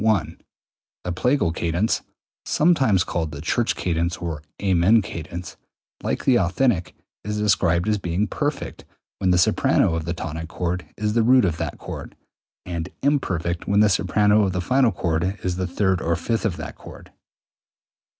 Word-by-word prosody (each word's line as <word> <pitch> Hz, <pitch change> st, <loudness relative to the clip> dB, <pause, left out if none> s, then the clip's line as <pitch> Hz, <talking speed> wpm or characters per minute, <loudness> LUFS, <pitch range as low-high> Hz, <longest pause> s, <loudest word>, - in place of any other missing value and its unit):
The 90 Hz, -, -3 dB
plagal 125 Hz, -, +1 dB
cadence 85 Hz, +6 st, 0 dB, 0.4 s
(sometimes 135 Hz, -, +3 dB
called 80 Hz, -3 st, -3 dB
the 70 Hz, -, -7 dB
church 110 Hz, +9 st, 0 dB
cadence, 85 Hz, -1 st, -1 dB
or 80 Hz, -4 st, -4 dB, 0.2 s
amen 95 Hz, +3 st, +4 dB
cadence), 85 Hz, -3 st, -7 dB, 0.4 s
like -, -, -2 dB
the 125 Hz, -3 st, +5 dB
authentic, 90 Hz, 0 st, +1 dB, 0.3 s
is 105 Hz, +1 st, -3 dB
described 100 Hz, -4 st, +2 dB
as 105 Hz, -1 st, +1 dB
being 90 Hz, +3 st, -1 dB
perfect 145 Hz, +6 st, -3 dB, 0.4 s
when 95 Hz, -, +1 dB
the 90 Hz, -, +4 dB
soprano 85 Hz, -1 st, +3 dB
of 80 Hz, -1 st, -2 dB
the 85 Hz, 0 st, -2 dB
tonic 80 Hz, -1 st, -5 dB
chord 90 Hz, +2 st, -3 dB
is 105 Hz, 0 st, -1 dB
the 115 Hz, -, +3 dB
root 125 Hz, 0 st, +5 dB
of 80 Hz, -3 st, -1 dB
that -, -, -4 dB
chord, -, -, -8 dB, 0.5 s
and 85 Hz, -1 st, -4 dB
imperfect 90 Hz, -, 0 dB
when 100 Hz, +1 st, +4 dB
the 105 Hz, -, +5 dB
soprano 105 Hz, +2 st, +3 dB
of 95 Hz, -3 st, +1 dB
the 90 Hz, -, -1 dB
final 130 Hz, +5 st, +3 dB
chord 85 Hz, +3 st, -1 dB
is 90 Hz, -1 st, -1 dB
the 95 Hz, -1 st, -1 dB
third 95 Hz, 0 st, 0 dB
or 85 Hz, -2 st, +1 dB
fifth 115 Hz, +7 st, -2 dB
of 95 Hz, -6 st, -1 dB
that -, -, -6 dB
chord. -, -, -13 dB
90 Hz, 160 wpm, -23 LUFS, 85-105 Hz, 0.5 s, the